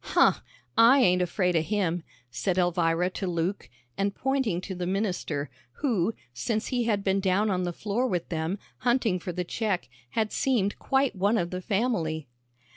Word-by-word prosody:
"Huh, - - +4 0.4
I 230 +4 +7
ain't 180 -4 +4
afraid 180 0 +1
o' 165 - +4
him," 180 -1 0 0.3
said 150 +10 -1
Elvira 175 0 +2
to 190 - -4
Luke, 175 +3 -2 0.3
and 200 0 0
pointing 265 -9 0
to 190 - -5
the 180 -1 -3
minister, 180 -7 -2 0.2
who 225 - 0 0.2
since 215 - -2
he 245 -3 0
had 205 -3 +1
been 195 0 +2
down 195 +2 +2
on 180 -1 0
the 175 - -1
floor 215 +8 -1
with 180 -7 -2
them, 165 +3 -2 0.2
hunting 240 -6 +2
for 180 - -4
the 180 +1 -2
check, 195 - -2 0.3
had 220 -1 +1
seemed 220 -7 +1
quite 270 -2 +1
one 200 +4 +2
of 175 -3 -1
the 185 0 -3
family. 185 - -1
190 Hz, 175 wpm, -27 LUFS, 175-220 Hz, 0.4 s, I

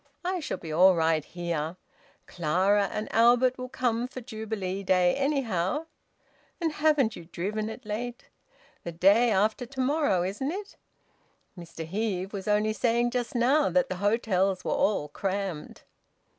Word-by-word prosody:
I 365 0 -1
shall 310 - -4
be 160 - -8
all 180 +4 +6
right 160 -2 +2
here. 170 -1 -4 0.5
Clara 190 +5 +1
and 215 - -3
Albert 245 +3 +4
will 255 0 -5
come 245 -2 -1
for 255 0 -8
Jubilee 215 -5 -4
Day, 180 -2 +3
anyhow. 275 - -1 0.7
But 330 -2 0
haven't 300 -7 +2
you 170 - -10
driven 210 +6 -3
it 225 +2 -9
late?... 240 +4 -5 0.6
The 170 - -5
day 200 +8 +4
after 215 +4 +1
to 265 +2 -10
morrow, 260 - +2
isn't 210 - -2
it? 400 +3 -7 0.8
Mr 165 -2 -8
Heve 195 +1 -3
was 195 -1 -6
only 210 +1 +2
saying 240 +1 +1
just 245 0 -3
now 270 +5 +3
that 270 -1 +1
the 185 - -3
hotels 195 -3 +1
were - - -1
all 200 -8 +1
crammed." 190 0 -4
215 Hz, 150 wpm, -27 LUFS, 185-250 Hz, 0.8 s, all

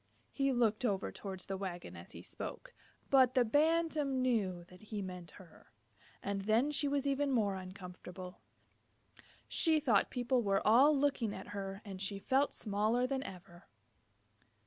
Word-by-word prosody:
He 275 -1 +1
looked 235 -2 +2
over 200 -5 0
towards 190 -2 -7
the 195 -1 -4
wagon 185 -3 -6
as - - -11
he - - -10
spoke, - - -7 0.4
but 260 -2 +5
the 250 -2 +5
Bantam 300 0 +2
knew 205 -9 0
that 180 +1 -17
he 215 0 -6
meant 180 -3 -6
her, 180 - -17 0.5
and 200 0 -2
then 230 +7 +3
she 290 0 0
was 280 0 0
even 280 0 +1
more 215 -6 +2
uncomfortable. 185 -1 -9 1.1
She 320 -2 +3
thought 235 -9 +3
people 245 0 +1
were 195 -3 +1
all 270 +7 +6
looking 270 -6 +1
at - - -9
her, 195 0 -5
and 190 -2 -7
she 200 0 -2
felt 270 +7 +2
smaller 215 +4 +1
than 265 0 -1
ever. 180 -6 -10
220 Hz, 155 wpm, -34 LUFS, 195-270 Hz, 1.1 s, all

